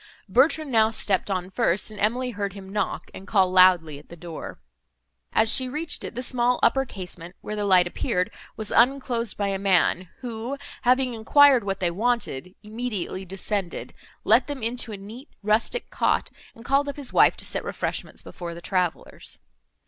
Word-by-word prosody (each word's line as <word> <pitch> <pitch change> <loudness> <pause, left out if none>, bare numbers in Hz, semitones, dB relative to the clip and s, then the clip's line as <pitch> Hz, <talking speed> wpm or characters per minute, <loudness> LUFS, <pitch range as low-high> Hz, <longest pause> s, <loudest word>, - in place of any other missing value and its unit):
Bertrand 280 +7 +2
now 220 -2 +4
stepped 205 -3 0
on 185 -1 -2
first, 205 -2 0
and 210 - -10
Emily 245 +4 0
heard 200 -3 -4
him 195 -1 -10
knock, 205 -2 -2
and 195 - -10
call 190 -3 +3
loudly 180 -5 +5
at 150 - -19
the 170 - -10
door. 170 -1 -8 0.7
As 220 0 +4
she 260 -1 +2
reached 305 +3 -1
it, - - -7
the 250 - -3
small 245 0 +1
upper 270 0 +3
casement, 180 -5 -9
where 210 - -5
the 210 -1 -2
light 185 -3 +5
appeared, 180 +3 -1 0.3
was 215 -1 -2
unclosed 240 -3 +2
by 200 -1 0
a 195 -1 -2
man, 185 -2 +2
who, 240 +2 -5 0.2
having 255 0 +2
enquired 260 +3 +5
what 195 -1 -3
they 175 -2 0
wanted, 195 - -2
immediately 210 -4 -4
descended, 195 0 -4 0.3
let - - +4
them 285 -5 -5
into 235 0 -2
a 205 - -6
neat 220 +8 -11
rustic 220 - 0
cot, - - +1 0.2
and 230 - -14
called 280 +1 +2
up 285 - -6
his 280 -3 -6
wife - - +5
to - - -4
set - - -3
refreshments - - -4
before 170 -1 -7
the - - -8
travellers. 180 -2 -3
210 Hz, 180 wpm, -25 LUFS, 185-245 Hz, 0.7 s, loudly